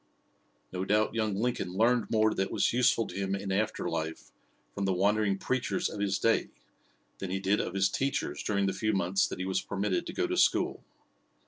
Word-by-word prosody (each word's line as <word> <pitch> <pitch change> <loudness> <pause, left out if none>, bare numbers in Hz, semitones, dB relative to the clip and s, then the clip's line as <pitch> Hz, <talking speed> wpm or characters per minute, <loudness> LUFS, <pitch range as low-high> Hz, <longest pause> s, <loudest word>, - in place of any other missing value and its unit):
No 90 0 -3
doubt 105 +3 +2
young 110 -3 0
Lincoln 110 -4 -1
learned 115 +2 +2
more 110 -1 +3
that 95 -1 -1
was - - +1
useful 125 -2 +3
to - - -9
him 95 0 -1
in 95 0 -4
after 110 0 -1
life 80 -1 -4 0.4
from 100 - -2
the 95 - +1
wandering 100 +1 +2
preachers 130 - -1
of - - -7
his 100 -1 +1
day 115 0 +2 0.7
than 95 - -4
he 95 - -1
did 95 +2 +1
of 90 - -5
his 95 0 +3
teachers 135 +8 -2
during 100 -1 0
the 95 - 0
few 110 +3 0
months 95 0 +1
that - - -6
he 95 - -3
was 95 0 0
permitted 100 -1 -2
to - - -5
go - - 0
to - - -2
school. - - +2
100 Hz, 205 wpm, -30 LUFS, 95-110 Hz, 0.7 s, more